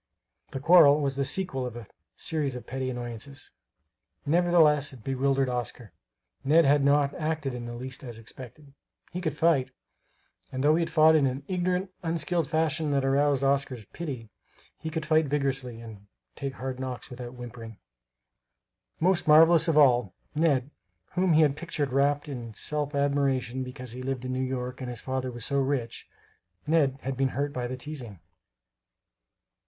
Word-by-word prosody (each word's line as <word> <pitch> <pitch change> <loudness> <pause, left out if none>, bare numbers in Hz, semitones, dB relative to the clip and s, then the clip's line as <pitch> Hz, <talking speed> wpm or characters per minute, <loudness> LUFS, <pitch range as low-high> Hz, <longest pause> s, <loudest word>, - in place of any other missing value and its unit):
The 135 - -5
quarrel 150 -1 +7
was 140 -2 -1
the 140 - 0
sequel 135 -3 -1
of 125 -2 -5
a 120 -2 -8 0.3
series 145 -5 -1
of 125 - -8
petty 130 0 -3
annoyances. 125 +2 -6 0.7
Nevertheless 155 -3 +3
it 120 -4 -13
bewildered 135 +1 +1
Oscar. 120 -3 -4 0.5
Ned 155 +4 +5
had 145 +1 +4
not 140 0 +3
acted 155 -3 -2
in 120 -1 -6
the 120 - -6
least 130 +2 -6
as 120 -3 -7
expected. 130 +5 -11 0.4
He 180 - -4
could 160 -3 -2
fight; 150 -6 +3 0.8
and 130 0 -3
though 150 +2 +5
he 165 0 +1
fought 160 -1 +5
in 145 -3 +4
an 130 +2 -3
ignorant, 180 +1 -1
unskilful 165 -1 -1
fashion 155 -1 0
that 140 -2 +1
aroused 140 0 +2
Oscar's 135 -4 0
pity, 125 - -7 0.4
he 160 - -6
could 160 -1 -3
fight 155 -1 +3
vigorously, 135 -4 -2
and 105 -3 -11 0.3
take 140 -2 -4
hard 130 0 -5
knocks 130 0 -5
without 125 0 -8
whimpering. 115 -3 -9 1.2
Most 180 0 +2
marvelous 160 +2 +7
of 160 -2 +2
all, 125 -8 +4 0.2
"Ned" 150 -4 +1 0.4
whom 180 -1 +2
he 155 - +5
had 145 -3 +3
pictured 145 -4 -3
wrapt 145 +2 +2
in 120 -6 -7
self 150 +2 0
admiration 135 -3 0
because 125 -1 -7
he 125 +2 -7
lived 130 -1 -3
in 130 - -3
New 130 - -1
York 130 0 -3
and 125 - -4
his 120 -2 -5
father 130 -1 -3
was 120 -2 -5
so 140 0 0
rich 135 -4 -2 0.6
Ned 150 -4 +2
had 135 0 -2
been 135 +1 +1
hurt 145 0 -1
by 125 -1 -3
the 130 +1 -5
teasing. 130 - -8
135 Hz, 165 wpm, -27 LUFS, 125-155 Hz, 1.2 s, quarrel